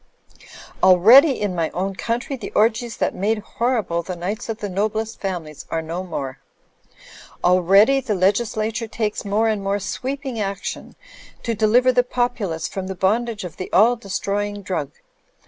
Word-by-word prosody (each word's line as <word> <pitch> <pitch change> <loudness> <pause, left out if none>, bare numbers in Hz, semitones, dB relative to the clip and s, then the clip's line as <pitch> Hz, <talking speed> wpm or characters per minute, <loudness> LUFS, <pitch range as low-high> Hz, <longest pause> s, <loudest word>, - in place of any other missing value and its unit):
Already 225 - +7
in 205 -3 -1
my 165 -2 -1
own 190 +2 -1
country 240 +7 -2
the 260 - -7
orgies 225 +2 +1
that - - 0
made 215 +4 0
horrible 215 -5 -1
the 180 +2 -6
nights 205 +8 -4
of 225 - -2
the 205 - -4
noblest 215 +3 -2
families 170 -6 -5
are 165 0 -2
no 170 +3 -4
more. 135 -7 -5 1.0
Already 195 +9 +5
the 225 -5 -2
legislature 215 +4 0
takes 215 -1 -3
more 210 +3 +1
and 215 -2 0
more 195 +1 0
sweeping 255 +5 -4
action 200 -1 -4 0.5
to 230 - -1
deliver 230 +4 +4
the 250 0 +4
populace 240 -10 -2
from 190 -1 -5
the 190 - -5
bondage 220 +4 0
of 175 -3 -8
the 185 - -6
all 230 +5 +5
destroying 205 -1 -3
drug. 175 -7 -3
205 Hz, 155 wpm, -21 LUFS, 185-230 Hz, 1.0 s, Already